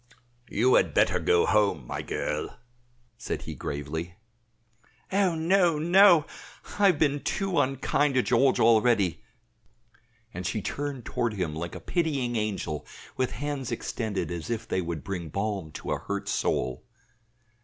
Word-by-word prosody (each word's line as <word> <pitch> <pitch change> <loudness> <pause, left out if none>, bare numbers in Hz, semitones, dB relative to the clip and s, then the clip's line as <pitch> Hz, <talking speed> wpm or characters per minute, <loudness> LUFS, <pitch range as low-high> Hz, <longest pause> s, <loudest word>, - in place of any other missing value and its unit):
"You 125 +5 +3
had - - +3
better - - +3
go 85 - +3
home, 100 - +2
my - - -4
girl," 75 - -3 0.6
said - - -4
he - - -6
gravely. 80 +5 -5 1.0
"Oh, 190 -3 +2
no, 170 0 +3
no! 175 0 +6 0.5
I 205 - +6
have 180 -5 +3
been 145 -2 +2
too 195 -5 -1
unkind 135 +1 +1
to 130 - +3
George 130 +2 +3
already," 110 -6 +3 1.1
and 90 - -5
she 110 - -1
turned 140 +3 -4
toward 120 -2 -1
him 90 -6 -2
like 85 +2 -5
a - - -6
pitying 140 -8 -1
angel 100 -8 -2 0.3
with 130 -1 0
hands 140 +2 -4
extended 105 -6 -3
as 85 +3 -5
if 115 -2 -3
they 95 - 0
would 85 -3 -4
bring 90 -5 -5
balm 100 -2 -3
to - - -6
a - - 0
hurt 100 0 -4
soul. 65 0 -1
115 Hz, 145 wpm, -27 LUFS, 90-145 Hz, 1.1 s, no